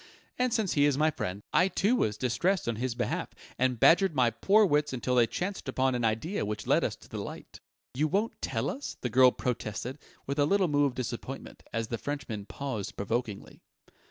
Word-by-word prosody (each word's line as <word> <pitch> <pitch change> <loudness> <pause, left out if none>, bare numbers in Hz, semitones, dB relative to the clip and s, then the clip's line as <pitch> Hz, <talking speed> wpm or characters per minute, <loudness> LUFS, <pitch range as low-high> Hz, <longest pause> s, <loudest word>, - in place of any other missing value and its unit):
And 250 -1 +2
since 220 -5 +1
he 145 -1 +4
is 145 -2 +2
my 155 +1 +3
friend, 100 -6 -4
I 180 - +5
too 200 +5 +2
was 105 - 0
distressed 150 - 0
on 115 -2 -1
his 125 0 -2
behalf, 120 - -3 0.2
and 125 -2 +1
badgered 175 - +5
my 125 -3 +3
poor 210 - +4
wits 150 -4 +1
until 125 0 -1
they 120 -2 +5
chanced 185 - -4
upon 130 0 +1
an 120 -1 -1
idea 115 - 0
which 105 0 -4
led - - +3
us - - -1
to - - -18
the - - -6
light." - - -8 0.3
"You 150 +5 +1
won't 205 +8 -1
tell - - -1
us?" 285 - -6
the 125 - -2
girl 130 +2 +7
protested, 125 +2 -4 0.3
with 140 +2 -3
a 145 - +5
little 195 +1 +3
moue 145 -2 +3
of 135 - -1
disappointment, 130 +2 -6
as 115 -1 -2
the 115 - -3
Frenchman 115 -8 -5
paused 130 -8 -5
provokingly. 110 0 -3
130 Hz, 205 wpm, -29 LUFS, 115-160 Hz, 0.3 s, girl